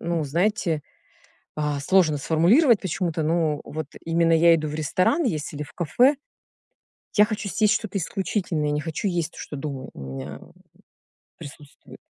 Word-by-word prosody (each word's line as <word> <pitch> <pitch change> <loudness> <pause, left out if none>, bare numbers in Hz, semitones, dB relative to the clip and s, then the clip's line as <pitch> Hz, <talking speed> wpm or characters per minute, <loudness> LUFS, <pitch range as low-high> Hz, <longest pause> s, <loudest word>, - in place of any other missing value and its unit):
ну, 170 -2 -1
знаете, 170 0 0 0.7
а 150 -2 -1
сложно 165 -3 +3
сформулировать 200 - +4
почему-то, 170 -3 -2
ну, 155 -2 +1
вот 155 -2 -5 0.2
именно 165 0 +2
я 165 +1 +6
иду 155 -1 -3
в 150 - -5
ресторан 185 - +1
есть 155 - -2
или 150 - -4
в - - -14
кафе, 245 - +3 1.0
я 210 - +7
хочу 210 -2 -4
съесть 210 +1 +2
что-то 205 -2 -2
исключительное, 180 -3 -2
я 150 - 0
не 150 - 0
хочу 165 +5 -3
есть 170 -2 -2
то, - - -13
что 145 - -7
дома 135 -2 -6
у - - -10
меня, 65 +2 -7
м, - - -17 0.9
присутствует. 145 0 -13
165 Hz, 165 wpm, -24 LUFS, 150-190 Hz, 1.0 s, я